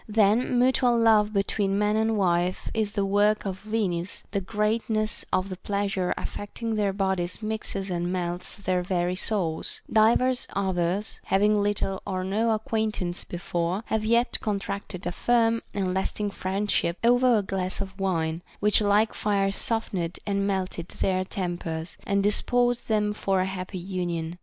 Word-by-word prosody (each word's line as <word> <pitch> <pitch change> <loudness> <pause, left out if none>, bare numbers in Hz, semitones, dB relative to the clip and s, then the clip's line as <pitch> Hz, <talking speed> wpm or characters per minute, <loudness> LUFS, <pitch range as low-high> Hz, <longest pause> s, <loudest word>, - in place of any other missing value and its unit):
That 210 0 +4
mutual 250 -1 +3
love 220 -2 +4
between 200 -1 0
man 210 +1 +2
and 220 0 +1
wife 180 -1 +1
is 215 -2 -1
the 200 -2 0
work 205 +2 +2
of 190 -1 -3
Venus, 200 -5 -2
the 200 0 0
greatness 215 +2 0
of 185 +1 +1
the 185 - -5
pleasure 200 -1 -1
affecting 225 +2 -4
their 210 -2 +1
bodies 190 0 -1
mixes 215 -3 -3
and 175 0 -1
melts 175 -1 -2
their 185 -3 -1
very 180 -1 0
souls; 185 -5 -1
divers 235 +4 +4
others, 190 +1 -1
having 210 +2 +3
little 200 -2 -1
or 185 -2 -2
no 210 +5 +1
acquaintance 215 -5 -1
before, 175 +3 -2
have 220 -1 -1
yet 235 +3 +2
contracted 200 -2 -3
a 175 - -1
firm 230 +3 +2
and 190 -2 -1
lasting 200 +2 -1
friendship 190 -2 -1
over 245 0 +5
a 205 - 0
glass 190 -1 -2
of 195 0 -6
wine, 165 -4 0 0.2
which 210 +1 +4
like 210 +2 +3
fire 200 -2 +1
softened 195 -5 -2
and 200 -1 0
melted 185 -3 -2
their 185 -1 0
tempers, 175 -3 -4
and 200 0 +2
disposed 245 +4 +2
them 210 -1 +2
for 195 -2 0
a - - +1
happy 190 0 -5
union. 175 -2 -3
200 Hz, 150 wpm, -26 LUFS, 185-215 Hz, 0.2 s, over